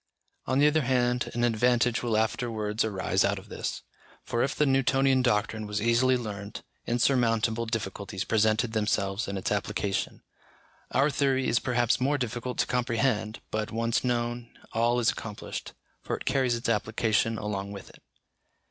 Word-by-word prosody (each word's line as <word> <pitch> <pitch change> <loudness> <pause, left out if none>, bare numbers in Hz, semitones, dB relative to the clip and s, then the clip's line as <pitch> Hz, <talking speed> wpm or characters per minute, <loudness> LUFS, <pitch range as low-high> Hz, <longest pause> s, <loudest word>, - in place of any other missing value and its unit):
On 130 - +1
the 145 - +5
other 150 +1 +4
hand, 125 -1 +1
an 120 - 0
advantage 120 +1 +2
will 115 -3 0
afterwards 110 -1 0
arise 95 -3 0
out 100 0 +1
of 95 +2 -11
this: - - -4 0.4
for 120 - -1
if 135 - 0
the 150 - +2
Newtonian 135 0 +3
doctrine 110 -2 0
was 105 0 -2
easily 120 +3 +3
learnt, 105 -3 -6 0.2
insurmountable 115 -2 +2
difficulties 100 -3 -3
presented 110 +1 +2
themselves 105 -2 0
in 100 0 -3
its 95 - -2
application. 100 -1 -2 0.7
Our 140 +4 +2
theory 135 -2 +1
is 115 - +3
perhaps 125 0 +1
more 145 +3 +2
difficult 125 0 -4
to - - +2
comprehend, 115 -3 0
but 110 0 -2
once 115 +2 0
known, 120 -1 -1 0.2
all 120 +2 +2
is 115 - +3
accomplished, 105 -2 -7 0.3
for - - -3
it - - -10
carries 130 -3 +2
its 115 +1 -4
application 110 0 +1
along 100 -2 -4
with 100 -2 -9
it. - - -20
115 Hz, 155 wpm, -28 LUFS, 110-125 Hz, 0.7 s, the